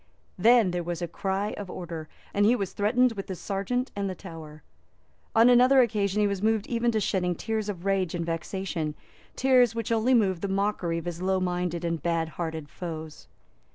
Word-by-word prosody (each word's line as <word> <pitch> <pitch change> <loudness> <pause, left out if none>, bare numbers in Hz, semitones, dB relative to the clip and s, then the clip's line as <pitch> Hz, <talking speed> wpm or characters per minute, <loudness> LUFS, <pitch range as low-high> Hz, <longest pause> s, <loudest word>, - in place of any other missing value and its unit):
Then 225 0 +5
there 175 0 -1
was 175 0 -4
a - - -1
cry 195 +4 -2
of 200 -2 -6
Order; 165 -4 -6 0.2
and 205 - +2
he 225 +4 +5
was 195 -5 -3
threatened 245 +5 +3
with 200 -3 -6
the 190 - -4
Serjeant 200 +8 -2
and 200 -1 -2
the 185 - -4
Tower. 160 -5 -10 0.7
On 225 +1 +7
another 250 +2 +6
occasion 210 -3 +1
he - - +4
was 200 -2 -2
moved 220 -1 +1
even 235 0 0
to 220 - +2
shedding 180 -3 0
tears 220 +2 -3
of 185 -3 -6
rage 190 -3 +1
and 170 -1 -2
vexation, 165 -2 -3 0.4
tears 250 -3 +4
which 230 0 -3
only 230 +3 +3
moved 190 -7 +2
the 200 - -1
mockery 195 -3 0
of 165 - -5
his 175 0 -5
low 190 0 +1
minded 180 -1 -2
and 170 -1 -1
bad 165 -1 0
hearted 160 -2 -5
foes. 160 -1 -7
190 Hz, 195 wpm, -27 LUFS, 170-220 Hz, 0.7 s, On